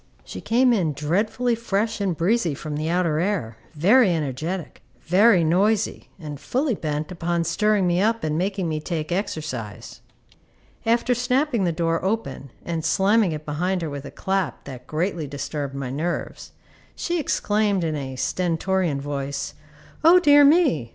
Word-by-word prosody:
She -, -, -8 dB
came 245 Hz, +2 st, +3 dB
in 170 Hz, -9 st, +1 dB
dreadfully 205 Hz, -, 0 dB
fresh 220 Hz, -1 st, -1 dB
and 185 Hz, -5 st, -1 dB
breezy 175 Hz, -3 st, +1 dB
from 150 Hz, +2 st, -6 dB
the 155 Hz, +2 st, -2 dB
outer 170 Hz, -3 st, +1 dB
air, 170 Hz, -, -2 dB, 0.2 s
very 205 Hz, -, +5 dB
energetic, 160 Hz, +3 st, -3 dB, 0.2 s
very 190 Hz, +1 st, +4 dB
noisy, 195 Hz, +6 st, +1 dB
and 150 Hz, -5 st, -8 dB
fully 265 Hz, -, -1 dB
bent 155 Hz, -3 st, -3 dB
upon 170 Hz, -1 st, -1 dB
stirring 210 Hz, +4 st, +1 dB
me 175 Hz, +1 st, +2 dB
up 225 Hz, +2 st, +1 dB
and 155 Hz, -1 st, -1 dB
making 190 Hz, +1 st, -1 dB
me 155 Hz, -1 st, -2 dB
take 155 Hz, 0 st, -4 dB
exercise. 155 Hz, -, -4 dB, 0.9 s
After 235 Hz, +2 st, +2 dB
snapping 250 Hz, -2 st, +1 dB
the 170 Hz, -, +1 dB
door 165 Hz, 0 st, -1 dB
open 200 Hz, -8 st, -3 dB, 0.2 s
and 165 Hz, -2 st, -3 dB
slamming 200 Hz, +2 st, +3 dB
it 155 Hz, -1 st, -6 dB
behind 180 Hz, +5 st, -1 dB
her 155 Hz, -, -3 dB
with 140 Hz, 0 st, -6 dB
a -, -, -6 dB
clap 190 Hz, -8 st, -2 dB
that 130 Hz, -2 st, -10 dB
greatly 165 Hz, 0 st, -2 dB
disturbed 140 Hz, 0 st, -5 dB
my 135 Hz, -2 st, -4 dB
nerves, 165 Hz, +6 st, -4 dB, 0.4 s
she 345 Hz, 0 st, -2 dB
exclaimed 210 Hz, -, 0 dB
in 160 Hz, -2 st, -1 dB
a 135 Hz, -2 st, -5 dB
stentorian 175 Hz, 0 st, 0 dB
voice, 140 Hz, -1 st, -4 dB, 0.5 s
"O 340 Hz, +3 st, +8 dB
dear 290 Hz, -4 st, +6 dB
me! 280 Hz, -, +4 dB
175 Hz, 155 wpm, -23 LUFS, 150-210 Hz, 0.9 s, O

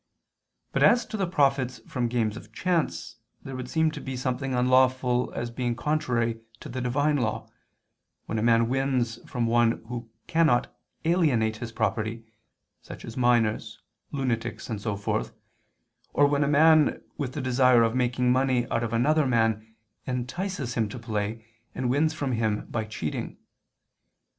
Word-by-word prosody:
But -, -, -1 dB
as 240 Hz, -1 st, +5 dB
to 220 Hz, -, -7 dB
the 195 Hz, -3 st, 0 dB
profits 135 Hz, -6 st, +1 dB
from 125 Hz, -2 st, -1 dB
games 115 Hz, -3 st, 0 dB
of -, -, -11 dB
chance, 170 Hz, -9 st, -1 dB, 0.3 s
there 135 Hz, -, -7 dB
would 130 Hz, -1 st, -6 dB
seem 160 Hz, +1 st, +2 dB
to -, -, -7 dB
be 130 Hz, -1 st, -5 dB
something 130 Hz, +1 st, -2 dB
unlawful 125 Hz, 0 st, +3 dB
as 120 Hz, 0 st, -3 dB
being 120 Hz, 0 st, -2 dB
contrary 120 Hz, -5 st, -1 dB, 0.2 s
to -, -, -9 dB
the 130 Hz, -, -4 dB
Divine 145 Hz, +4 st, +1 dB
Law, 110 Hz, -5 st, -2 dB, 0.8 s
when 110 Hz, -, -2 dB
a -, -, 0 dB
man 115 Hz, 0 st, +4 dB
wins 130 Hz, -3 st, 0 dB
from 120 Hz, -3 st, -1 dB
one 115 Hz, 0 st, +3 dB, 0.2 s
who 120 Hz, -2 st, -6 dB, 0.2 s
cannot 160 Hz, -7 st, +2 dB, 0.3 s
alienate 135 Hz, -11 st, +2 dB
his 115 Hz, 0 st, -6 dB
property, 110 Hz, +1 st, -2 dB, 0.6 s
such -, -, -10 dB
as 115 Hz, -, -8 dB
minors, 115 Hz, -3 st, +1 dB, 0.3 s
lunatics 125 Hz, -4 st, -2 dB
and 105 Hz, -2 st, -3 dB
so 105 Hz, -1 st, -2 dB
forth, 65 Hz, -11 st, -2 dB, 0.8 s
or 145 Hz, -, +5 dB
when 145 Hz, 0 st, +2 dB
a -, -, +1 dB
man, 155 Hz, +1 st, +4 dB, 0.2 s
with 130 Hz, -3 st, -3 dB
the 150 Hz, -, -4 dB
desire 125 Hz, -1 st, +4 dB
of 115 Hz, 0 st, +1 dB
making 125 Hz, 0 st, +1 dB
money 130 Hz, -1 st, +2 dB
out -, -, +1 dB
of 115 Hz, -1 st, -3 dB
another 145 Hz, +5 st, +3 dB
man, 110 Hz, -2 st, 0 dB, 0.3 s
entices 130 Hz, +2 st, -3 dB
him 110 Hz, -3 st, 0 dB
to 130 Hz, -, -7 dB
play, 110 Hz, -1 st, -3 dB, 0.3 s
and 125 Hz, -1 st, -1 dB
wins 155 Hz, +4 st, +2 dB
from 145 Hz, -4 st, -3 dB
him 110 Hz, -3 st, 0 dB
by 110 Hz, -2 st, -1 dB
cheating. 95 Hz, -8 st, -5 dB
125 Hz, 160 wpm, -26 LUFS, 115-135 Hz, 0.8 s, as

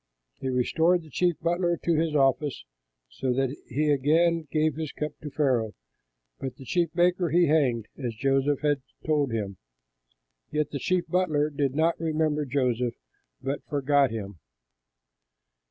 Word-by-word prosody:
He 130 Hz, -, -3 dB
restored 160 Hz, +8 st, +2 dB
the 155 Hz, -, -15 dB
chief 175 Hz, +4 st, +2 dB
butler 175 Hz, +1 st, +1 dB
to 170 Hz, -, 0 dB
his 160 Hz, -1 st, 0 dB
office, 140 Hz, 0 st, +1 dB, 0.4 s
so 95 Hz, -, -2 dB
that 135 Hz, 0 st, 0 dB, 0.2 s
he 150 Hz, +4 st, +1 dB
again 160 Hz, +4 st, +2 dB
gave 155 Hz, -1 st, +2 dB
the 155 Hz, +1 st, -4 dB
cup 150 Hz, -1 st, -2 dB
to 150 Hz, -, -6 dB
Pharaoh; 130 Hz, -7 st, +1 dB, 0.7 s
but 130 Hz, -, -5 dB
the 135 Hz, -, -12 dB
chief 170 Hz, +4 st, +1 dB
baker 175 Hz, 0 st, +3 dB
he 175 Hz, +3 st, +4 dB
hanged, 135 Hz, -8 st, +2 dB, 0.2 s
as 120 Hz, -2 st, -2 dB
Joseph 135 Hz, +3 st, +1 dB
had 145 Hz, -2 st, +1 dB, 0.2 s
told 150 Hz, -3 st, +2 dB
them. 105 Hz, -4 st, -3 dB, 0.9 s
Yet 150 Hz, -1 st, -1 dB
the 140 Hz, -, -3 dB
chief 180 Hz, +4 st, 0 dB
butler 155 Hz, -4 st, +1 dB
did 140 Hz, -2 st, -1 dB
not 165 Hz, +2 st, +2 dB
remember 155 Hz, -2 st, 0 dB
Joseph, 125 Hz, -3 st, 0 dB, 0.5 s
but 135 Hz, +2 st, -3 dB
forgot 140 Hz, -1 st, +2 dB
him. 100 Hz, -5 st, -6 dB
145 Hz, 150 wpm, -27 LUFS, 130-160 Hz, 0.9 s, he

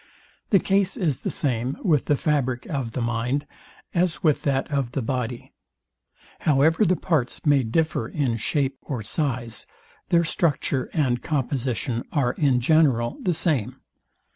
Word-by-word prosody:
The 200 Hz, -, +6 dB
case 195 Hz, 0 st, +1 dB
is 155 Hz, -8 st, 0 dB
the -, -, -3 dB
same 130 Hz, -1 st, -1 dB
with 155 Hz, -8 st, +2 dB
the 145 Hz, -, +3 dB
fabric 130 Hz, -5 st, 0 dB
of 135 Hz, -7 st, -3 dB
the 125 Hz, -, -2 dB
mind, 120 Hz, +5 st, -1 dB, 0.5 s
as 170 Hz, -3 st, 0 dB
with 155 Hz, -4 st, +3 dB
that 135 Hz, -2 st, 0 dB
of 135 Hz, -4 st, -1 dB
the 135 Hz, -, -1 dB
body. 125 Hz, 0 st, -3 dB, 0.9 s
However 155 Hz, +6 st, +3 dB
the 185 Hz, 0 st, +3 dB
parts 150 Hz, -9 st, -1 dB
may 145 Hz, -2 st, +5 dB
differ 125 Hz, 0 st, 0 dB
in 125 Hz, -4 st, -1 dB
shape 135 Hz, +3 st, -1 dB
or 125 Hz, -6 st, -5 dB
size, 120 Hz, -3 st, -1 dB, 0.4 s
their 170 Hz, 0 st, +4 dB
structure 150 Hz, -4 st, 0 dB
and 130 Hz, -7 st, +1 dB
composition 130 Hz, -4 st, -1 dB
are 135 Hz, -5 st, +1 dB
in 135 Hz, -5 st, +2 dB
general 130 Hz, -5 st, +3 dB
the 180 Hz, -3 st, 0 dB
same. 130 Hz, -, 0 dB
135 Hz, 145 wpm, -24 LUFS, 120-155 Hz, 0.9 s, The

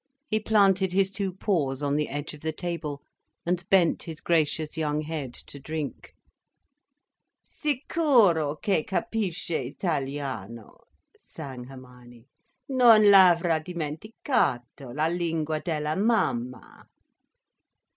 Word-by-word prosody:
He 215 Hz, -7 st, 0 dB
planted 195 Hz, -3 st, +3 dB
his 195 Hz, 0 st, +2 dB
two 195 Hz, -1 st, -2 dB
paws 150 Hz, -8 st, -1 dB
on 140 Hz, 0 st, 0 dB
the 150 Hz, 0 st, -1 dB
edge 145 Hz, +2 st, -5 dB
of 150 Hz, -, -12 dB
the 160 Hz, -, -2 dB
table 155 Hz, -4 st, -5 dB, 0.4 s
and 175 Hz, 0 st, 0 dB
bent 180 Hz, -4 st, +3 dB
his 160 Hz, -2 st, -7 dB
gracious 155 Hz, -1 st, 0 dB
young 150 Hz, -2 st, -1 dB
head 150 Hz, -4 st, -5 dB
to 140 Hz, -, -11 dB
drink. 155 Hz, 0 st, -6 dB, 1.3 s
"Sicuro 245 Hz, -, +2 dB
che 195 Hz, -7 st, +1 dB
capisce 190 Hz, -, -2 dB
italiano," 135 Hz, -, -5 dB, 0.3 s
sang 130 Hz, -6 st, -9 dB
Hermione, 125 Hz, -2 st, -14 dB, 0.5 s
"_non 230 Hz, -5 st, +7 dB
l'avrà 175 Hz, -4 st, +5 dB
dimenticato, 155 Hz, -, -2 dB
la 150 Hz, +5 st, 0 dB
lingua 165 Hz, -2 st, -1 dB
della 155 Hz, -2 st, -2 dB
Mamma. 130 Hz, -, -1 dB
160 Hz, 105 wpm, -26 LUFS, 145-190 Hz, 1.3 s, non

